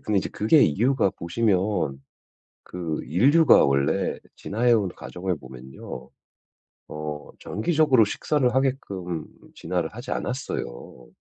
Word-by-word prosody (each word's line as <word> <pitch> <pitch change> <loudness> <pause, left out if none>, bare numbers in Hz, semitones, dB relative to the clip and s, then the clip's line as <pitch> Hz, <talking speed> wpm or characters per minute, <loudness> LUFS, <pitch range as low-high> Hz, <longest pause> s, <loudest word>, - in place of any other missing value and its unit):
근데 105 -2 0
이제 - - -2
그게 125 +8 +4
이유가 115 - +2
보시면 90 -7 -1 0.6
그 85 -4 -5
인류가 140 - +5
원래 70 +7 +1 0.2
진화해 120 +4 0
온 110 -4 +3
과정을 90 -1 -4
보면요. 65 -1 -10 0.8
어 75 -1 -6
정기적으로 135 - +3
식사를 125 +4 0
하게끔 100 - -2 0.3
진화를 90 -3 -2
하지 120 +3 -8
않았어요. 65 - -5
95 Hz, 260 characters per minute, -24 LUFS, 75-125 Hz, 0.8 s, 인류가